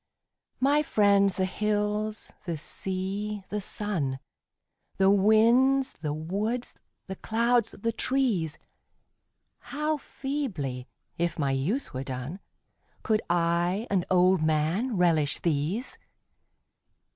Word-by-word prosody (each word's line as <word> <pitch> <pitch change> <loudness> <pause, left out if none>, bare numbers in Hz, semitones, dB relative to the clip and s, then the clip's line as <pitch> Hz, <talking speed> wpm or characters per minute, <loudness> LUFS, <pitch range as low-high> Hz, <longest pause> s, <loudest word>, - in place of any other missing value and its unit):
My 285 +3 +3
friends 200 -7 +3
the 190 - +1
hills, 210 +2 -2
the 170 -2 -2
sea, 195 +5 -2
the 210 0 -2
sun, 180 -11 -2 0.8
The 195 0 +5
winds, 235 +7 +4
the 155 -1 -4
woods, 205 +10 -2 0.3
the 190 -1 -7
clouds, 235 0 +1
the 230 +3 0
trees 225 - 0 1.0
How 300 +1 -2
feebly, 205 - -4 0.3
if 170 0 0
my 140 -4 0
youth 160 - -1
were 130 +1 -3
done, 130 +7 -5 0.6
Could 215 -1 +2
I, 175 +4 +1
an 185 -3 +1
old 185 -1 +4
man, 160 +10 +1
relish 160 -5 +2
these 170 - -1
195 Hz, 105 wpm, -27 LUFS, 170-225 Hz, 1.0 s, The